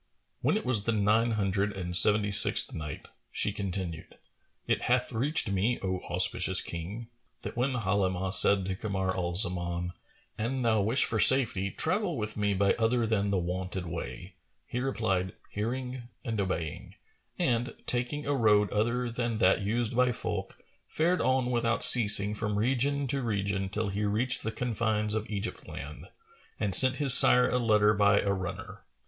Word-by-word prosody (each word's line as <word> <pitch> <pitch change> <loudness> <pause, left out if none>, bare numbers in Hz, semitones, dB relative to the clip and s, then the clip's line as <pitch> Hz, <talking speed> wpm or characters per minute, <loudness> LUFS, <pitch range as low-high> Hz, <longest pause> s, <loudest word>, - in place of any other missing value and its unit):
When - - 0
it - - -7
was 115 -5 -1
the 115 - 0
Nine 110 +3 0
Hundred 100 0 -2
and 90 -2 -3
Seventy 105 +3 +7
sixth 100 - +7
Night, 75 -2 -8 0.2
She 105 - -2
continued, 95 -5 -7 0.5
It - - -2
hath - - -1
reached 130 -1 -1
me, 105 +6 -1
O 95 -1 -3
auspicious 90 +1 +3
King, 95 +8 -7 0.4
that - - -8
when 125 +3 -2
Halimah 95 -4 -2
said 100 -2 +4
to 95 0 -4
Kamar 95 -2 -4
al 90 -1 -4
Zaman, 90 -2 -2 0.5
"An 125 +4 -3
thou 110 -3 +1
wish 115 +7 +2
for 110 - -2
safety, 110 -6 +5
travel 185 - -3
with 105 -1 -5
me 105 -1 -2
by 100 +1 +1
other 115 +1 0
than 105 -2 -2
the 100 - -1
wonted 90 +1 -5
way," 85 0 -8 0.3
he 125 - -6
replied, 110 -8 -3 0.2
"Hearing 125 +3 -6 0.2
and 110 -3 -3
obeying;" 85 -5 -6 0.4
and, 120 0 -2
taking 125 +4 -2
a 145 - -2
road 105 -6 +1
other 120 +4 -2
than 120 -1 -4
that 95 0 +1
used 115 +3 -3
by 125 0 +1
folk, - - -6 0.3
fared 175 +3 -1
on 130 -1 -1
without 120 -1 -1
ceasing 105 -3 +6
from 105 -1 -4
region 135 +5 -1
to 135 +1 -3
region 100 -4 -3
till 105 +1 -4
he 100 +2 -4
reached 115 +6 -2
the 110 - -5
confines 110 -2 -3
of 110 -1 -5
Egypt 105 +1 -6
land[FN#436] - - -10 0.5
and 105 -3 -3
sent 130 +7 +3
his 140 -4 +7
sire 125 -2 +8
a 125 - -2
letter 105 -3 +2
by 100 0 +2
a 100 - -2
runner. 95 -2 -8
105 Hz, 165 wpm, -27 LUFS, 95-120 Hz, 0.5 s, sire